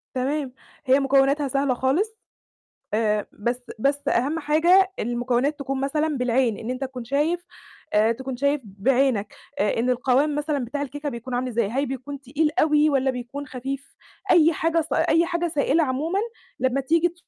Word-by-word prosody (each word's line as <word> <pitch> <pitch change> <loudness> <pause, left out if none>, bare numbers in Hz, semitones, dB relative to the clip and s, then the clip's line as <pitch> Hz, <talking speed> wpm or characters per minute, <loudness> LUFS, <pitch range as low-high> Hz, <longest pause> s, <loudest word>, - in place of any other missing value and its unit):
تمام، 265 +1 -1 0.3
هي 265 +1 +5
مكوناتها 275 +1 +3
سهلة 275 0 +1
خالص، 320 - 0 0.8
آآ، 210 -1 +1
بس 240 +4 -3 0.2
بس 280 +4 +1
أهم 285 +6 +1
حاجة 345 +6 +4
المكونات 245 +5 0
تكون 270 -1 -3
مثلًا 300 +2 0
بالعين، 250 -3 +1
إن 225 - -6
أنت 255 +2 -3
تكون 255 -2 -6
شايف 295 +8 0 0.5
آآ، 215 +2 +4
تكون 265 +2 -5
شايف 280 +2 +1
بعينك 235 +3 0 0.3
آآ، 205 - +1
إن 245 +2 +1
القوام 260 +4 +2
مثلًا 295 -3 -1
بتاع 285 +5 -4
الكيكة 290 +1 -4
بيكون 240 0 -7
عامل 250 +1 -1
إزاي، 235 -4 0
هل 270 +5 0
بيكون 270 +2 -6
تقيل 300 +4 0
أوي 305 0 +4
والَّا 270 -2 +2
بيكون 260 +3 -6
خفيف؟ 270 +2 -6 0.4
أي 330 0 +6
حاجة 330 +2 +1
س 315 - -4
أي 330 +1 +3
حاجة 345 0 -1
سائلة 315 0 +2
عمومًا 305 +8 -1 0.4
لمّا 260 +2 +1
تيجي 330 +5 +2
275 Hz, 165 wpm, -24 LUFS, 250-300 Hz, 0.8 s, أي